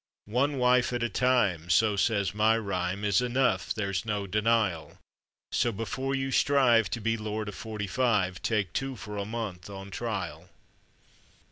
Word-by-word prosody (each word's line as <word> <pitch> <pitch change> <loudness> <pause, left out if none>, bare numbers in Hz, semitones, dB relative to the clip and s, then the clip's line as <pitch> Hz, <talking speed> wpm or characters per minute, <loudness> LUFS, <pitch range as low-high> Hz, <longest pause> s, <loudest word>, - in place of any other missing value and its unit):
One 140 +3 +2
wife 125 0 +3
at 120 -1 -1
a 120 - 0
time, 105 -10 +1
so 105 +4 +4
says 100 -2 +1
my 110 +2 +3
rhyme, 100 -2 -2
Is 100 +2 +3
enough, 125 +1 +1
there's 100 -2 -1
no 105 -3 -2
denial; 105 -4 0 0.5
So, 120 - +1
before 125 +6 -3
you 135 0 -2
strive 125 -8 +4
to 115 - -3
be 115 +1 0
lord 110 0 -4
of - - -7
forty 105 0 -5
five, 100 -4 0
Take 100 -6 -1
two 135 -1 -2
for 105 -3 -7
a 100 - -2
month 105 -5 -5
on 100 0 -8
trial. 90 -8 -4
110 Hz, 160 wpm, -28 LUFS, 100-120 Hz, 0.5 s, so